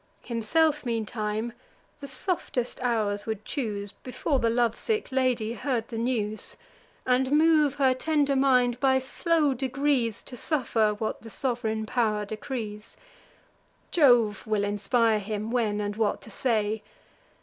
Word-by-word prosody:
Himself, 295 +7 +1
meantime, 220 -1 -2 0.5
the 280 - -7
softest 260 -4 0
hours 215 -5 0
would 220 -1 -4
choose, 205 -7 -3
Before 260 +4 -2
the 230 - +2
love 235 -1 +2
sick 435 - -2
lady 250 -4 +1
heard 245 -3 -2
the 230 - -5
news; 220 -3 -2 0.5
And 255 +1 +2
move 305 -2 +4
her 270 -2 +3
tender 285 +1 +1
mind, 250 -3 +3
by 265 -1 +4
slow 295 +3 +1
degrees, 260 -2 0
To 255 - -9
suffer 230 -6 +1
what 220 0 -3
the 225 - -10
sov'reign 225 -2 -2
pow'r 215 -2 0
decrees: 215 -1 -6 0.9
Jove 240 - +4
will 215 -2 +1
inspire 210 +2 +2
him, 210 +2 -4
when, 220 -4 0
and 205 0 -2
what 215 -1 0
to 220 - -12
say. 215 -2 0
235 Hz, 135 wpm, -27 LUFS, 215-265 Hz, 0.9 s, move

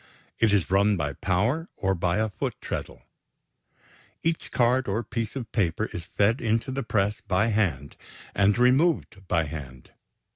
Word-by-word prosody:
It 115 -2 +4
is 100 -3 +1
run 100 +1 +4
by 75 -3 -2
power 110 - 0
or 95 0 +1
by 85 +1 0
a 110 0 0
foot - - -3
treadle. - - -6 1.2
Each 165 0 -1
card 125 +1 +2
or 105 +4 -1
piece 115 +1 -4
of 125 -4 -5
paper 105 0 0
is 85 - -5
fed 105 +6 +1
into 115 +3 0
the 135 +1 -2
press 105 -3 0
by 100 +4 +2
hand 85 - -1 0.4
and 100 +2 +3
removed 125 - +2
by 85 -2 +2
hand. 70 -4 -8
105 Hz, 155 wpm, -26 LUFS, 90-120 Hz, 1.2 s, It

